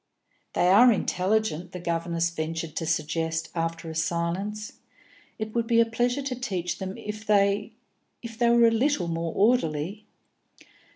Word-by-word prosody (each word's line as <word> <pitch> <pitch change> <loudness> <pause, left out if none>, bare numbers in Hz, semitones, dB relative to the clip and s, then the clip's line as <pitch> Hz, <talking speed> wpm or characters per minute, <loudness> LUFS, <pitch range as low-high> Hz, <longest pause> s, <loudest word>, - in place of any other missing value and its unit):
"They 180 - +3
are 235 +6 +7
intelligent," 190 -3 0
the 180 - -5
governess 170 0 -1
ventured 165 -1 -4
to 165 - -2
suggest, 160 0 -1
after 165 0 -3
a 160 - -5
silence. 175 +6 -2 0.6
"It 215 -1 -5
would 235 -1 0
be 230 -1 +4
a 230 - +6
pleasure 245 +4 -1
to 265 -1 -2
teach 190 -9 -3
them 190 +2 -5
if 210 -1 -6
they 205 0 +2 0.5
if 230 -1 -7
they 235 +1 +2
were 235 0 +6
a - - +3
little 230 - +1
more 165 0 -2
orderly." 200 -3 +1
195 Hz, 155 wpm, -26 LUFS, 165-225 Hz, 0.6 s, are